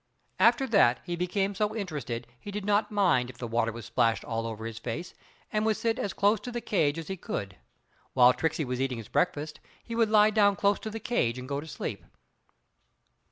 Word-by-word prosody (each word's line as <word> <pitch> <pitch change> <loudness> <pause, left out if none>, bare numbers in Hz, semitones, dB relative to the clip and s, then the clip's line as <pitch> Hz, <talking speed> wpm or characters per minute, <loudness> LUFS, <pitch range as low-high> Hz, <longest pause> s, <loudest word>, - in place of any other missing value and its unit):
After 240 +3 +5
that 195 - +4
he 175 -1 -3
became 195 +3 -1
so 210 +2 -1
interested 150 - -4
he - - -9
did 205 -1 -4
not 210 +1 +2
mind 185 - +2
if 125 - -11
the 125 - -5
water 115 0 0
was 115 0 -8
splashed 115 -3 +1
all 115 0 -2
over 110 0 -6
his 115 -1 -6
face 125 +10 -5 0.4
and 215 0 +1
would 220 -1 +1
sit 230 -1 0
as 200 - -1
close 205 +2 +2
to 245 - -7
the 240 - -3
cage 160 -10 +1
as 165 -2 -6
he 190 - -3
could 100 - -4
get. - - -23 0.5
While 125 -1 +7
Tricksey 160 0 -1
was 125 0 -3
eating 130 -2 -1
his 115 -2 -9
breakfast 155 -3 -1 0.2
he 230 - -7
would 230 -1 +2
lie 215 0 +6
down 205 -2 +4
close 200 +2 +2
to 220 - -5
the 225 +1 -5
cage 130 - 0
and 125 0 -7
go 140 0 -2
to 160 - -10
sleep. - - -5
170 Hz, 220 wpm, -28 LUFS, -, 0.5 s, While